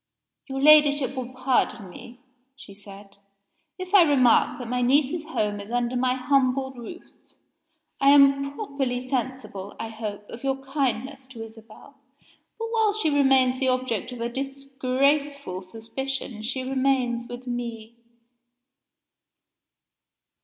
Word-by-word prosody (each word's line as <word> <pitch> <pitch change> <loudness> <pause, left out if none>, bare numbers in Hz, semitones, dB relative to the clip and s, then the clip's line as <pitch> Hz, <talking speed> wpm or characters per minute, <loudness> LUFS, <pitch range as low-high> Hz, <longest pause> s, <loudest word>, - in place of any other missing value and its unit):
"Your 270 -1 -4
Ladyship 290 -1 +5
will 255 -1 -5
pardon 255 -6 0
me," 245 +6 -13 0.3
she 210 -7 -13
said, 200 0 -14 0.6
"if 370 0 -7
I 400 - +9
remark 275 -7 +4
that 245 - -7
my 250 +1 -1
niece's 285 +5 +2
home 210 -10 -2
is 200 +1 -9
under 245 +1 -1
my 250 0 +1
humble 265 0 +1
roof. 255 +8 -9 1.0
I 275 - +5
am 275 0 +5
properly 275 - -2
sensible, 245 -7 -4
I 225 - -4
hope, 210 -2 -6
of 230 - -9
your 270 0 0
kindness 265 -1 -2
to 235 -4 -9
Isabel, 225 0 -16 0.6
but 455 - -4
while 440 -2 +2
she 405 -8 0
remains 265 -2 +3
the 265 - +1
object 255 -3 -1
of 245 -2 -8
a 235 - 0
disgraceful 275 -2 -1
suspicion 230 +4 -5
she 255 +4 -3
remains 255 -3 0
with 245 +1 -8
me." 235 -2 -5
255 Hz, 130 wpm, -25 LUFS, 235-275 Hz, 1.0 s, I